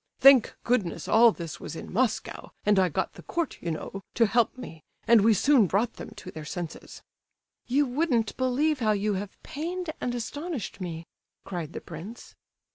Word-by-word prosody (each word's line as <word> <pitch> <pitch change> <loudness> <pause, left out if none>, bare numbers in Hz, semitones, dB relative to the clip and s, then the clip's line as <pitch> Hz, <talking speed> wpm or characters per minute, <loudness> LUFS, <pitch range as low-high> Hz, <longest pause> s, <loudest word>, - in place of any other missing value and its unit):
Thank 270 -4 +7
goodness 220 -8 0
all 230 +1 +7
this 165 -5 -7
was - - -7
in - - -8
Moscow, 240 +2 -1 0.2
and 205 -1 +4
I 185 -1 +3
got 145 - -2
the - - -12
Court, 340 -4 -3
you 170 - -3
know, 165 +4 -5
to 230 - +5
help 230 +3 +2
me, 160 -10 -9 0.2
and 230 -2 +7
we 220 +1 +5
soon 250 0 +5
brought 215 +6 0
them - - -7
to 185 -3 -9
their 155 - -8
senses." 170 +1 -7 0.6
"You 280 +4 +3
wouldn't 250 -5 0
believe 265 +4 +1
how 215 -3 +2
you 210 +1 0
have 200 +1 -5
pained 340 +3 -4
and 245 0 -1
astonished 290 - -5
me," 165 -2 -5 0.4
cried 170 -4 -5
the - - -6
prince. 180 +8 -9
225 Hz, 180 wpm, -27 LUFS, 185-255 Hz, 0.6 s, Thank